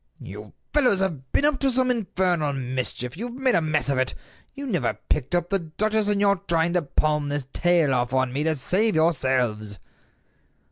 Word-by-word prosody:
"You - - -10 0.2
fellows 255 -10 +3
have 150 -9 -3
been 285 - +2
up 295 -3 +2
to 275 - +2
some 255 0 +2
infernal 180 -9 0
mischief. 130 -1 -3
You 225 +8 -4
have 240 - -9
made 260 -1 +1
a - - +3
mess 155 -2 0
of 140 -2 +1
it. 130 0 -1 0.4
You 280 0 -6
never 205 -10 -1
picked 150 +4 0
up 175 +1 -1
the 195 - +2
duchess, 210 +6 -1
and 205 -1 +1
you're 200 -1 +3
trying 170 0 +1
to 180 - +2
palm 150 0 0
this 145 -2 -3
tale 175 -5 +2
off 120 -1 0
on 130 -1 0
me 145 +2 -1
to 160 -1 +1
save 190 +9 +1
yourselves." 130 -10 0
165 Hz, 195 wpm, -24 LUFS, 135-205 Hz, 0.4 s, fellows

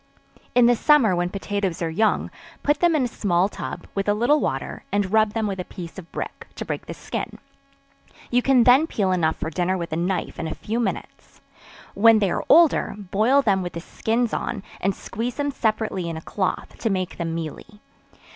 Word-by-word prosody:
In 245 -1 +6
the 240 0 +5
summer 240 -7 +4
when 175 0 0
potatoes 200 -2 -2
are 165 - -1
young, 215 +6 +1 0.3
put 295 +1 +2
them 345 -2 +3
in 290 - +2
a - - +1
small 190 -5 +1
tub, - - -7
with 195 +1 -1
a 205 - +3
little 245 +8 +3
water, - - -3
and 205 -1 0
rub 215 -1 +4
them 225 -1 -1
with 195 -2 -3
a - - -2
piece 175 +1 -9
of 170 - -13
brick, - - -6
to - - -5
break - - -5
the - - -6
skin; - - -5 0.9
you 245 +1 +3
can 255 -2 +4
then 260 +7 +6
peel 195 -10 0
enough 165 -3 +1
for 160 - -4
dinner 180 +3 0
with 170 -3 -5
a - - 0
knife 180 +3 -2
in - - -2
a 160 - -4
few 225 +3 -3
minutes. 240 - -5 0.5
When 225 +2 +6
they 200 -4 +1
are - - -1
older, 330 -2 +5
boil 215 +8 +2
them 195 -5 +2
with 175 -1 -5
the 170 - -4
skins 225 +6 -1
on, 205 -5 -3 0.2
and 195 +1 0
squeeze 235 +4 -4
them 285 -1 -1
separately 215 -7 -1
in 165 - -4
a - - -7
cloth, 190 +3 -3
to 225 - 0
make 185 -3 -2
them 165 -1 -3
mealy. 165 +6 -7
205 Hz, 210 wpm, -23 LUFS, 180-240 Hz, 0.9 s, In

